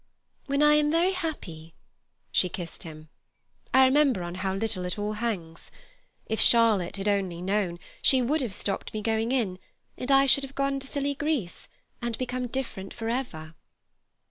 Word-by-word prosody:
When 280 Hz, +1 st, +2 dB
I 300 Hz, 0 st, +6 dB
am 300 Hz, 0 st, +3 dB
very 335 Hz, +4 st, +3 dB
happy"—she 180 Hz, -, -4 dB
kissed 175 Hz, -1 st, -7 dB
him—"I 160 Hz, +10 st, -2 dB
remember 265 Hz, -7 st, +3 dB
on 175 Hz, 0 st, -5 dB
how 190 Hz, +1 st, -2 dB
little 195 Hz, -3 st, -2 dB
it 180 Hz, -, -3 dB
all 210 Hz, +1 st, -2 dB
hangs. 200 Hz, -8 st, -4 dB, 0.6 s
If 220 Hz, -, -2 dB
Charlotte 225 Hz, -7 st, +4 dB
had 195 Hz, +1 st, -3 dB
only 195 Hz, -4 st, 0 dB
known, 185 Hz, -1 st, -1 dB, 0.2 s
she 265 Hz, -, +5 dB
would 280 Hz, +5 st, +1 dB
have 235 Hz, -7 st, -3 dB
stopped 200 Hz, +1 st, -3 dB
me 215 Hz, -, -3 dB
going 225 Hz, +1 st, 0 dB
in, 210 Hz, -9 st, 0 dB, 0.4 s
and 250 Hz, -, -4 dB
I 275 Hz, 0 st, +6 dB
should 275 Hz, +1 st, +5 dB
have 275 Hz, 0 st, -7 dB
gone 275 Hz, 0 st, 0 dB
to 270 Hz, -, -7 dB
silly 280 Hz, +1 st, -1 dB
Greece, 280 Hz, -, -2 dB, 0.3 s
and 235 Hz, -1 st, -2 dB
become 250 Hz, 0 st, -3 dB
different 235 Hz, -7 st, -5 dB
for 225 Hz, -1 st, -4 dB
ever." 170 Hz, -11 st, -4 dB
225 Hz, 165 wpm, -27 LUFS, 185-270 Hz, 0.6 s, I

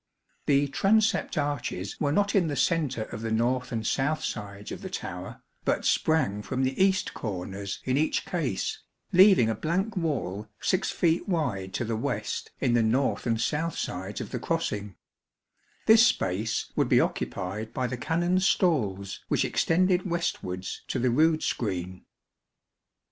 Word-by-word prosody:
The 140 Hz, 0 st, +4 dB
transept 210 Hz, +4 st, +2 dB
arches 145 Hz, -10 st, -2 dB
were 145 Hz, -2 st, +2 dB
not 200 Hz, +5 st, +2 dB
in 185 Hz, -5 st, +3 dB
the 145 Hz, -, -2 dB
centre 145 Hz, -8 st, +1 dB
of 110 Hz, 0 st, -8 dB
the 115 Hz, -, -2 dB
north 125 Hz, +3 st, 0 dB
and 110 Hz, -2 st, -2 dB
south 145 Hz, +6 st, 0 dB
sides 100 Hz, 0 st, -5 dB
of -, -, -6 dB
the -, -, -6 dB
tower, -, -, -6 dB, 0.2 s
but -, -, 0 dB
sprang 130 Hz, -11 st, +2 dB
from 130 Hz, +6 st, -2 dB
the 130 Hz, +8 st, +2 dB
east 190 Hz, -1 st, +1 dB
corners 100 Hz, -1 st, -5 dB
in 130 Hz, +1 st, +1 dB
each 155 Hz, +2 st, +1 dB
case, 435 Hz, 0 st, -2 dB, 0.3 s
leaving 185 Hz, -, +7 dB
a 110 Hz, -, +1 dB
blank 185 Hz, -, -1 dB
wall 120 Hz, -, -2 dB
6 185 Hz, 0 st, +1 dB
feet 170 Hz, +3 st, +1 dB
wide 110 Hz, -, -1 dB
to 120 Hz, -, -1 dB
the 115 Hz, 0 st, -1 dB
west 110 Hz, -, -3 dB
in 120 Hz, -, +1 dB
the 120 Hz, -, +4 dB
north 125 Hz, +4 st, +1 dB
and 115 Hz, -1 st, +1 dB
south 155 Hz, +7 st, -1 dB
sides 95 Hz, +3 st, -4 dB
of -, -, -6 dB
the -, -, -3 dB
crossing, 100 Hz, -1 st, -2 dB, 0.9 s
this 225 Hz, +2 st, +8 dB
space 110 Hz, -, -1 dB
would -, -, +1 dB
be -, -, +5 dB
occupied 105 Hz, +4 st, -2 dB
by 130 Hz, -, -2 dB
the 125 Hz, -, -2 dB
Canons' 175 Hz, +7 st, +1 dB
stalls 100 Hz, -, +1 dB
which -, -, +1 dB
extended 185 Hz, +2 st, +2 dB
westwards 95 Hz, -, -3 dB
to -, -, -2 dB
the 125 Hz, 0 st, +2 dB
rood 155 Hz, +5 st, +3 dB
screen. 95 Hz, -4 st, -3 dB
130 Hz, 160 wpm, -27 LUFS, 105-165 Hz, 0.9 s, this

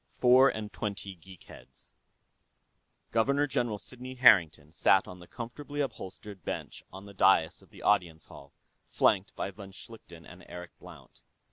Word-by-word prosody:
III. -, -, -29 dB
Four 130 Hz, +2 st, +6 dB
and 105 Hz, -1 st, -6 dB
Twenty 100 Hz, -1 st, -5 dB
Geek 95 Hz, +1 st, -16 dB
Heads -, -, -13 dB, 1.2 s
Governor 140 Hz, +6 st, +2 dB
General 120 Hz, -6 st, -1 dB
Sidney 130 Hz, +5 st, -9 dB
Harrington 85 Hz, -, +4 dB
sat 95 Hz, +3 st, +3 dB
on 90 Hz, 0 st, -10 dB
the 90 Hz, -, -14 dB
comfortably 145 Hz, +5 st, -8 dB
upholstered 100 Hz, -, -6 dB
bench -, -, -6 dB
on 95 Hz, +1 st, -11 dB
the 100 Hz, -, -12 dB
dais 95 Hz, -4 st, +3 dB
of -, -, -21 dB
the -, -, -14 dB
Audience 85 Hz, -6 st, +1 dB
Hall, 70 Hz, 0 st, -14 dB, 0.4 s
flanked 100 Hz, -1 st, +1 dB
by 100 Hz, -, -4 dB
von 100 Hz, 0 st, -11 dB
Schlichten 95 Hz, -5 st, -13 dB
and 90 Hz, +1 st, -14 dB
Eric 90 Hz, 0 st, -9 dB
Blount. -, -, -15 dB
100 Hz, 155 wpm, -29 LUFS, 90-120 Hz, 1.2 s, Four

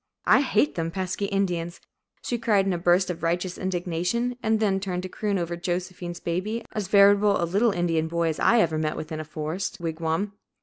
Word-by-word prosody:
"I -, -, +6 dB
hate 285 Hz, +1 st, +2 dB
them 165 Hz, -1 st, -2 dB
pesky 185 Hz, +2 st, -3 dB
Indians," 180 Hz, -4 st, -1 dB, 0.4 s
she 240 Hz, -, -2 dB
cried 210 Hz, -4 st, +2 dB
in 195 Hz, -, +1 dB
a -, -, -1 dB
burst 180 Hz, +1 st, +3 dB
of 170 Hz, -, -7 dB
righteous 175 Hz, +2 st, -1 dB
indignation, 185 Hz, +6 st, -1 dB
and 220 Hz, -2 st, +1 dB
then 200 Hz, -3 st, +2 dB
turned 185 Hz, -2 st, -3 dB
to 185 Hz, -, -5 dB
croon 205 Hz, +1 st, -1 dB
over 170 Hz, -1 st, -2 dB
Josephine's 175 Hz, 0 st, -4 dB
baby, 200 Hz, +8 st, -3 dB
as 210 Hz, -3 st, -3 dB
veritable 200 Hz, +1 st, +5 dB
a 170 Hz, -, +1 dB
"little 200 Hz, +8 st, +2 dB
Indian 165 Hz, -3 st, 0 dB
boy" 170 Hz, 0 st, 0 dB
as 155 Hz, -, -3 dB
I 235 Hz, 0 st, +5 dB
ever 160 Hz, -2 st, +1 dB
met 155 Hz, -1 st, -1 dB
with 155 Hz, -, -6 dB
in 155 Hz, -, -3 dB
a -, -, -3 dB
forest 155 Hz, +5 st, -4 dB
wigwam. 165 Hz, +4 st, -2 dB
180 Hz, 205 wpm, -25 LUFS, 170-200 Hz, 0.4 s, I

